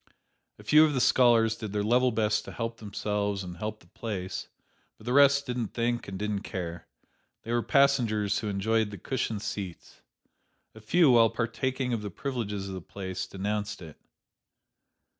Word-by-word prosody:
A - - -14
few 155 +1 +6
of 150 -2 +2
the - - +1
scholars 115 -3 +4
did 110 -3 -7
their 105 0 0
level 125 +4 +3
best 105 -1 +1
to - - -8
help 115 -1 -4
themselves 105 -1 -2
and 90 -1 -8
help 110 +3 -5
the 85 - -20
place, 95 -1 -5 0.5
but 110 - -16
the 125 - -1
rest 140 0 +5
didn't 125 -4 -3
think 120 0 -1
and 95 -1 -5
didn't 105 0 -2
care. 85 -6 -6 0.6
They 115 - -3
were 120 - +2
passengers 115 -8 +2
who 110 - -4
enjoyed 110 +2 +1
the 100 - -8
cushioned 110 0 -3
seats. 95 -5 -6 0.7
A 110 - -13
few, 155 +6 +4
while 115 -2 +6
partaking 125 +3 -2
of 115 - -1
the 105 - -5
privileges 105 -3 -4
of 95 - -6
the 95 - -6
place, 95 +1 -5
denounced 105 +2 -3
it. 80 -4 -12
110 Hz, 175 wpm, -28 LUFS, 100-120 Hz, 0.7 s, few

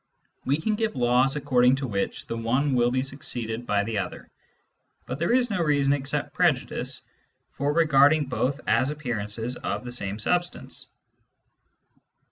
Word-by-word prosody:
We 140 +4 +1
can 215 +7 0
give 220 -4 -1
laws 125 +2 +3
according 130 -3 +3
to 135 -1 -3
which 100 -4 -2
the - - -4
one 120 +6 0
appearance 125 -3 +3
wiU 120 - +2
be 130 +1 +1
succeeded 120 -4 -3
by 100 0 +2
the 110 0 -2
other, - - -6 0.7
but 125 +3 -5
there 170 +5 +1
is 245 -1 +3
no 190 -4 0
reason 145 -3 +3
except 140 -1 -2
prejudice - - 0 0.5
for 140 +1 -1
regarding 150 -1 +4
both 135 +2 -1
as 125 +4 +2
appearances 120 -4 -3
of - - -4
the 120 - -5
same 100 -4 -3
substance. 175 +10 -2
135 Hz, 155 wpm, -26 LUFS, 120-150 Hz, 0.7 s, regarding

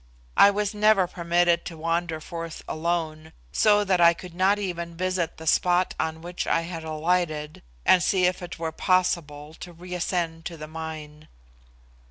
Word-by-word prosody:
I 200 - +8
was 205 0 -1
never 210 -2 +4
permitted 175 0 +1
to 165 - -7
wander 165 0 -1
forth 165 0 -7
alone, 160 -1 -3 0.2
so 205 - +4
that 190 -3 +1
I 170 0 +6
could 180 0 -11
not 190 +3 +3
even 170 -4 -4
visit 185 -2 -1
the 160 - -10
spot 180 +3 +2
on 160 0 -2
which 175 +1 -4
I 165 - +2
had 165 -1 -6
alighted, 155 -1 -1 0.2
and 185 - +6
see 185 0 +2
if 180 +1 0
it 175 0 -7
were 165 -1 -3
possible 160 -4 0
to 180 - -8
reascend 175 -1 -3
to 170 - -6
the 155 - -7
mine. 155 -1 -8
170 Hz, 165 wpm, -25 LUFS, 160-180 Hz, 0.2 s, I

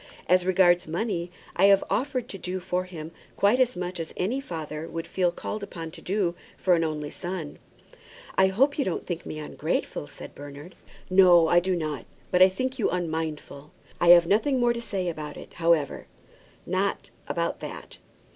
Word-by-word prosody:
As 180 0 +3
regards 180 -2 +4
money, 175 0 -2 0.3
I 190 - +5
have 200 -1 +6
offered 255 -1 -1
to 195 - -7
do 185 +1 -3
for 180 0 -2
him 165 -3 -8 0.2
quite 205 +6 +3
as 250 -4 +2
much 180 0 -4
as 165 - -6
any 235 +9 -1
father 160 - -6
would 165 0 -5
feel 180 -2 +1
called 210 +4 -5
upon 165 -5 -7
to - - -11
do 190 -2 0 0.2
for 185 - +3
an 165 -1 +3
only 150 -2 -3
son." 175 -5 -6 0.8
"I 190 - +5
hope 270 +10 +2
you - - +3
don't 185 - -3
think 175 -2 -5
me - - -5
ungrateful," 150 - -3
said - - -11
Bernard. 145 +4 -10 0.3
"No, 180 -3 +6
I 175 - +6
do 185 +1 0
not; 155 -7 -3 0.3
but 180 - +3
I 185 - +9
think 255 +7 -3
you 220 - +2
unmindful. 160 -4 -4 0.3
I 175 - +2
have 175 0 +9
nothing 225 +9 +2
more 240 -1 +3
to 235 - -5
say 195 -5 -3
about 155 -3 -5
it, - - -11
however; 165 -4 +1 0.6
not - - -1 0.2
about - - -1
that. - - -8
180 Hz, 185 wpm, -26 LUFS, 165-195 Hz, 0.8 s, I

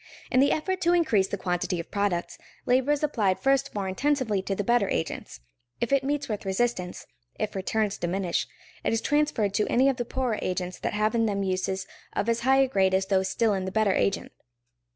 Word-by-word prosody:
In 255 - +4
the 280 - +5
effort 370 +4 -1
to 345 0 +3
increase 225 - +3
the 200 - -3
quantity 180 -1 -1
of 165 - -7
products, 200 -4 -1 0.3
labor 255 +3 +3
is 295 0 0
applied 210 -11 +1
first 275 -1 +1
more 200 -2 -2
intensively 235 -1 0
to 195 +1 -2
the 205 - -2
better 235 -2 +2
agents. 70 -6 -3 0.4
If 235 - -1
it 275 -1 +3
meets 285 +1 -1
with 210 -3 -3
resistance, 190 -2 -1 0.3
if - - -2
returns 210 +2 -1
diminish, 175 +1 -1 0.4
it - - +1
is 225 - +2
transferred 290 -9 +1
to 210 - +1
any 260 +3 +4
of 265 - -1
the 240 - -2
poorer 245 -3 -1
agents 180 -1 -3
that - - -2
have 215 +2 +1
in 230 -1 +2
them 200 -1 -1
uses 190 0 -1 0.3
of 205 - -1
as 230 0 +1
high 265 +2 +4
grade 190 -7 +2
as 190 0 +1
those 190 -1 +1
still 225 0 +2
in 190 -1 -2
the 190 - -3
better 215 -1 +2
agent. 195 - 0
210 Hz, 210 wpm, -27 LUFS, 190-260 Hz, 0.4 s, the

